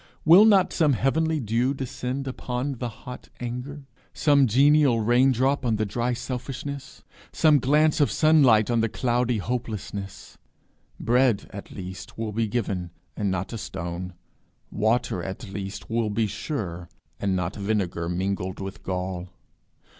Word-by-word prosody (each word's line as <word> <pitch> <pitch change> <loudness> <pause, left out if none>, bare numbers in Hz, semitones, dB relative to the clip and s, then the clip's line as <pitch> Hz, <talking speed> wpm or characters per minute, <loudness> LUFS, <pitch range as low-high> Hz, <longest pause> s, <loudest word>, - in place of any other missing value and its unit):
Will 175 +7 +8
not 200 -4 +4
some 155 -4 +3
heavenly 160 +5 +1
dew 120 +3 0
descend 130 0 -4
cool 130 - -3
upon 125 +2 -3
the 125 - -2
hot 125 +2 -10
anger? 125 +4 -5 0.3
some 140 -3 +4
genial 140 +1 +4
rain 120 +4 +4
drop 135 +3 +1
on 115 -3 +1
the 110 0 0
dry 120 +4 -1
selfishness? 135 +3 -6 0.3
some 155 -3 +4
glance 150 +4 +3
of 145 - +4
sunlight 135 -9 +4
on 120 - +2
the 115 - +1
cloudy 120 0 0
hopelessness? 105 -3 -5 0.6
Bread, 120 -3 +2
at 100 - -8
least, 95 0 -8
will 110 -1 -3
be 110 +1 0
given, 100 -6 -2 0.3
and 100 -1 -1
not 95 +3 -3
a 115 - -4
stone; 90 0 -5 0.6
water, 110 -3 0
at 95 +5 -6
least, 100 -1 -6
will 115 -1 0
be 110 +2 0
sure, 90 - -5 0.3
and 100 -2 0
not 90 +1 -2
vinegar 100 -5 -1
mingled 95 +1 -2
with 95 +1 -7
gall. 90 -1 -4
115 Hz, 145 wpm, -25 LUFS, 100-135 Hz, 0.6 s, Will